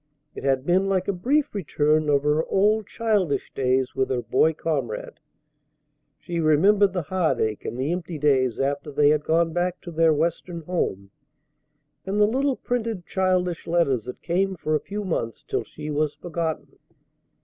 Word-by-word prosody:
It - - -8
had 135 -1 +1
been 185 +3 +2
like 185 -1 0
a 200 - +1
brief 280 +11 0
return 155 -5 +1
of 140 -1 +3
her 150 +2 +2
old 210 +2 +2
childish 210 -9 0
days 130 0 +1
with 130 -1 0
her 125 -2 -1
boy 160 - +3
comrade. 140 -9 -3 1.0
She 170 -1 -4
remembered 190 +6 +4
the 180 -3 -1
heartache 140 - -1
and 120 - -4
the 140 +5 0
empty 175 -2 -4
days 130 -5 +2
after 140 +2 -1
they 145 +1 +4
had 150 0 +2
gone 165 +1 +1
back 175 +1 -1
to 175 - -8
their 165 0 +3
Western 170 +2 -1
home, 100 - -2 0.9
and 195 +2 -2
the 210 - +6
little 265 +5 +1
printed 230 -8 -3
childish 180 -2 0
letters 140 -9 +1
that 125 - -8
came 190 +2 0
for 155 -2 -2
a 155 - +3
few 205 +5 -5
months 115 - -3
till - - -1
she 150 - -7
was 150 0 0
forgotten. 165 -2 -4
165 Hz, 170 wpm, -24 LUFS, 145-190 Hz, 1.0 s, the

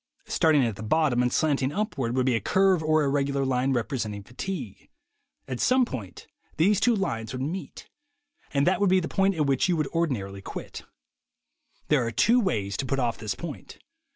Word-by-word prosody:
Starting 150 -5 +3
at 110 -4 -3
the - - -8
bottom 125 +2 +2
and 125 0 +1
slanting 140 -3 +1
up 210 +6 -2
ward, 120 -3 -2
would 130 -1 +1
be 130 - +2
a 115 - +1
curve 190 - +2
or 155 0 +2
irregular 140 -1 0
line 130 +1 +1
represent 115 -3 -2
ing 100 - -8
fatigue. 125 - -6 0.6
At 130 -2 -4
some 255 0 +3
point 110 - -8 0.3
these 190 +5 +3
two 235 0 +3
lines 115 - -3
would 130 - -4
meet; 175 +7 -6 0.6
and 140 0 +2
that 190 +2 +2
would 200 - +4
be 190 0 +4
the 165 - -3
point 195 0 +1
at 155 -2 +1
which 140 +5 +1
you 175 - +2
would 155 -2 0
ordinarily 110 - -2
quit. - - -7 1.1
There 145 -4 +3
are 115 - -1
two 230 - +3
ways 105 - -1
to 135 - -2
put 135 - 0
off 120 -3 -1
this 110 -2 -3
point. 165 -4 -8
140 Hz, 200 wpm, -26 LUFS, 120-170 Hz, 1.1 s, would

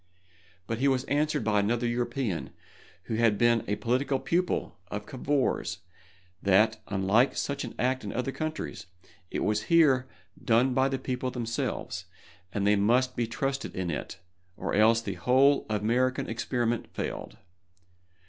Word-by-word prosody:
But 115 +2 -3
he 140 - +3
was 130 -2 +2
answered 150 -1 0
by 105 -1 +2
another 115 +4 0
European, 120 -4 -1 0.5
who 110 - -3
had 115 -3 +3
been 120 0 +3
a 105 - 0
political 130 +5 0
pupil 180 - -1
of 105 0 -5
Cavour's, 135 +3 -1 0.6
that, 110 +3 +3
unlike 100 +6 +2
such 140 - -2
an 120 - -7
act 130 0 0
in 100 - -4
other 125 +3 -2
countries, 155 - -5 0.4
it - - -2
was 105 0 0
here 140 -6 +5 0.4
done 120 +3 +3
by 130 +1 +3
the 135 - -1
people 130 0 -3
themselves, 120 -2 -3 0.5
and 100 -1 -1
they 105 +1 +5
must 125 +5 +2
be 120 -1 0
trusted 135 +3 -3
in 90 -2 -2
it, 80 +5 -5 0.4
or - - -3
else 115 +2 +5
the 100 -4 -4
whole 135 +4 +4
American 125 +5 +1
experiment 120 0 -1
failed. - - -5
120 Hz, 150 wpm, -28 LUFS, 110-130 Hz, 0.6 s, here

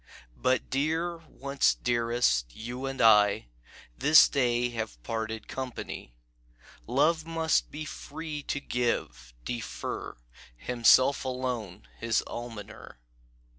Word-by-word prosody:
"But, 130 0 0
dear, 160 +5 0
once 140 -1 +1
dearest, 115 - +1
you 125 +4 -5
and 135 0 -5
I 105 - +5 0.5
This 150 +3 +7
day 120 -3 +1
have 110 - -4
parted 110 -1 -4
company. 130 - -6 0.7
Love 150 +7 +2
must 165 -1 +1
be 155 +1 -6
free 150 0 -6
to 140 - -3
give, 65 - -2
defer, 120 -2 -5 0.4
Himself 125 - +4
alone 125 -7 -4
his 115 -1 +1
almoner. 115 - -8
125 Hz, 100 wpm, -28 LUFS, 110-140 Hz, 0.7 s, This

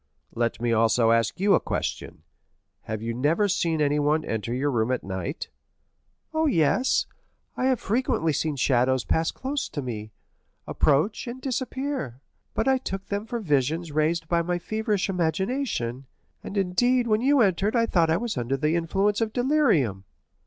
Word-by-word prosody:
"Let 115 -2 -1
me 120 0 0
also 115 +1 +3
ask 115 +3 +1
you 200 +1 +4
a - - +5
question. - - -4 0.6
Have 110 0 -4
you 115 0 -2
never 150 - +2
seen 170 -5 0
anyone 150 +1 +1
enter 110 0 -3
your 135 +4 0
room 115 -2 0
at 130 - -1
night?" 95 - -5 0.8
"Oh, 315 0 +2
yes; 240 - +2 0.5
I 255 - -1
have 260 -3 +2
frequently 205 - 0
seen 155 +1 -1
shadows 130 -1 +2
pass 160 0 +1
close 270 +1 -3
to - - -5
me, 110 -4 -6 0.5
approach, 155 - +1
and 240 +2 -6
disappear; 260 - -3 0.4
but - - 0
I 265 -1 +3
took 195 -6 -6
them 205 +2 -3
for 240 -1 -3
visions 155 - 0
raised 160 +2 0
by 170 0 +2
my 175 +1 -1
feverish 215 +1 -1
imagination, 175 - -2 0.4
and 205 - -6
indeed 240 +7 +2
when 215 -1 +2
you 275 +1 +4
entered 200 +2 +2
I 230 -1 +3
thought 170 -7 +2
I 160 - +3
was 225 - -3
under 125 +3 -1
the 150 +4 +1
influence 195 +6 +1
of 220 -1 0
delirium." 225 - +1
165 Hz, 165 wpm, -25 LUFS, -, 0.8 s, a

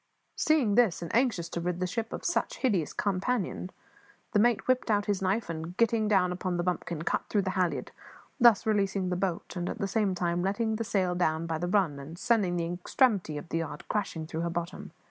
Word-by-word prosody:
Seeing 295 -10 +2
this, 215 -7 +3
and 170 - -6
anxious 230 -9 +2
to 170 - -4
rid 175 0 -2
the 185 - 0
ship 225 +5 -3
of - - -6
such 345 - 0
hideous 200 - +1
companionship, 195 -1 -1 0.6
the 205 - +3
mate 235 0 +2
whipped 255 -1 +2
out 205 -1 +2
his 205 -3 0
knife 195 +4 0
and, 165 +2 -6
getting 230 -2 +2
down 190 -4 +3
upon 180 0 -2
the 175 - 0
bumpkin, 175 -2 -2
cut - - -1
through 205 -2 +2
the 190 - -1
halliard, 180 -2 -1 0.5
thus 235 -4 +6
releasing 195 -3 +1
the 180 - 0
boat 180 -1 -2
and, 175 -1 -2
at - - -4
the 200 - -1
same 200 -2 +1
time, 175 -1 0
letting 215 +4 0
the 230 - -1
sail 190 -4 0
down 165 -2 0
by 165 -1 -2
the 175 - -2
run 180 -7 +1
and 150 +5 -9
sending 195 -4 +1
the 170 - 0
extremity 180 - +1
of 155 +3 -8
the 165 - 0
yard 150 -3 -6
crashing 195 -6 -2
through 160 0 -4
her 170 - -1
bottom. 170 +1 -5
185 Hz, 220 wpm, -29 LUFS, 170-215 Hz, 0.6 s, thus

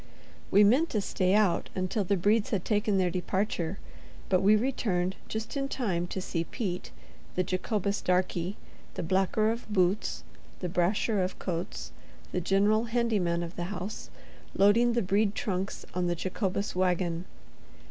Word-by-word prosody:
We 205 +2 +6
meant 265 +11 +4
to 215 - 0
stay 190 -1 +1
out 205 -5 +2
until 185 +3 0
the 195 +2 +1
Bredes 205 +4 +2
had 195 -4 -1
taken 210 -2 +1
their 180 -2 +2
departure; 185 -1 -1 0.5
but 185 -1 +3
we 205 +2 +6
returned 200 -6 0
just 220 +5 -4
in 275 -1 -1
time 190 -11 -1
to 190 - -4
see 170 -2 -2
Pete, 180 -4 -4 0.5
the 185 - +2
Jacobus 200 +2 -1
darkey, 180 0 0 0.4
the - - -3
blacker 190 +5 +2
of 230 -1 -6
boots, 190 +1 +1 0.4
the 180 - -3
brasher 190 +4 +1
of 185 - -3
coats, - - -4 0.4
the 180 - -1
general 205 +5 +3
handy 230 -2 +1
man 170 -1 0
of 170 +1 -7
the 175 - -3
house, 190 +2 -5 0.5
loading 230 +5 +5
the 235 -1 +1
Brede 200 +2 +2
trunks 190 -1 -3
on 180 0 0
the 175 - 0
Jacobus 190 +3 -2
wagon. 180 -1 0
195 Hz, 155 wpm, -29 LUFS, 180-215 Hz, 0.5 s, We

